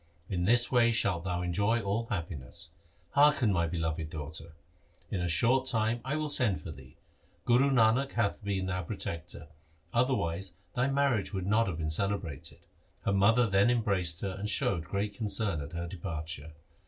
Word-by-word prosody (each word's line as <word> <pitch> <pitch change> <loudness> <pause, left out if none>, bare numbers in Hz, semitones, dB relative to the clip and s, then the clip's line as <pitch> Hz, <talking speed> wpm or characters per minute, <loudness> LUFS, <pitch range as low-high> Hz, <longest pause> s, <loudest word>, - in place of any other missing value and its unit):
In 90 -3 -1
this 120 +4 +5
way 120 -2 +4
shalt 100 -6 0
thou 90 -1 -2
enjoy 100 +6 +1
all 110 +2 -2
happi 85 -5 -3
ness. 65 0 -6 0.4
Hearken 140 -7 +4
my 85 -2 +1
beloved 80 -2 -3
daughter. 80 +2 -7 0.6
In 95 - -1
a 85 - 0
short 125 +9 +3
time 115 0 +1
I 135 +3 -2
will 155 0 -1
send 120 -10 +2
for 80 - -8
thee. 65 -3 -14 0.5
Guru 125 +4 +4
Nanak 125 +2 +3
hath 100 +1 -1
been 95 -2 -2
our 90 0 -1
protector, 85 -3 -5 0.5
otherwise 95 -8 0 0.2
thy 125 +1 +1
marriage 135 -8 +1
would 95 -1 -3
not 110 +3 +2
have 85 -5 -3
been 80 -1 -2
celebrated.' 90 -4 -3 0.4
Her 100 - +1
mother 115 +5 +4
then 100 +2 +3
embraced 100 -8 +1
her 100 - -2
and 105 +1 -3
showed 85 -5 +1
great 100 +3 -2
concern 105 -5 -1
at 70 +3 -8
her 85 0 -3
departure. 80 -3 -6
100 Hz, 170 wpm, -30 LUFS, 85-115 Hz, 0.6 s, this